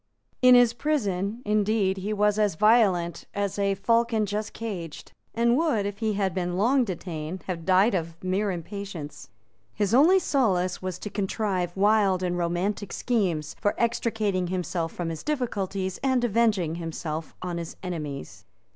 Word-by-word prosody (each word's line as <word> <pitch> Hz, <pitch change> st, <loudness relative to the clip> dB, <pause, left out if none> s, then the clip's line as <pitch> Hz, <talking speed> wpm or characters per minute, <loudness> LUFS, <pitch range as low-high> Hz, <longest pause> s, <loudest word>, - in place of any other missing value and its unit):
In 250 Hz, 0 st, +8 dB
his 245 Hz, -2 st, +6 dB
prison, 225 Hz, -5 st, -1 dB
indeed, 210 Hz, -2 st, +1 dB
he 195 Hz, +3 st, -3 dB
was 210 Hz, 0 st, +2 dB
as 210 Hz, -5 st, +2 dB
violent 195 Hz, -4 st, +3 dB
as 200 Hz, 0 st, -2 dB
a 200 Hz, -1 st, +1 dB
falcon 230 Hz, +2 st, +2 dB
just 210 Hz, +1 st, -3 dB
caged, 180 Hz, -9 st, -6 dB, 0.2 s
and 235 Hz, +1 st, +3 dB
would, 280 Hz, -9 st, +1 dB
if 200 Hz, 0 st, -4 dB
he 220 Hz, -2 st, 0 dB
had 195 Hz, -3 st, 0 dB
been 180 Hz, 0 st, -2 dB
long 250 Hz, +6 st, +3 dB
detained, 175 Hz, -3 st, -5 dB
have 170 Hz, -3 st, -4 dB
died 190 Hz, +4 st, +4 dB
of 165 Hz, -3 st, -2 dB
mere 190 Hz, +3 st, 0 dB
impatience. 180 Hz, -3 st, -6 dB, 0.5 s
His 205 Hz, 0 st, 0 dB
only 315 Hz, +9 st, +6 dB
solace 195 Hz, -, +1 dB
was 185 Hz, -1 st, -4 dB
to 210 Hz, -, -7 dB
contrive 190 Hz, -3 st, -2 dB
wild 200 Hz, -2 st, +3 dB
and 180 Hz, -1 st, 0 dB
romantic 180 Hz, +4 st, -1 dB
schemes 180 Hz, -11 st, -1 dB
for 205 Hz, -, +1 dB
extricating 220 Hz, -5 st, 0 dB
himself 175 Hz, -2 st, -2 dB
from 175 Hz, -2 st, -4 dB
his 160 Hz, -1 st, -5 dB
difficulties 200 Hz, -9 st, -2 dB
and 260 Hz, -2 st, +1 dB
avenging 210 Hz, -8 st, +1 dB
himself 160 Hz, -1 st, -5 dB
on 175 Hz, -1 st, -3 dB
his 165 Hz, -1 st, -7 dB
enemies. 150 Hz, -, -6 dB
200 Hz, 155 wpm, -26 LUFS, 180-220 Hz, 0.5 s, In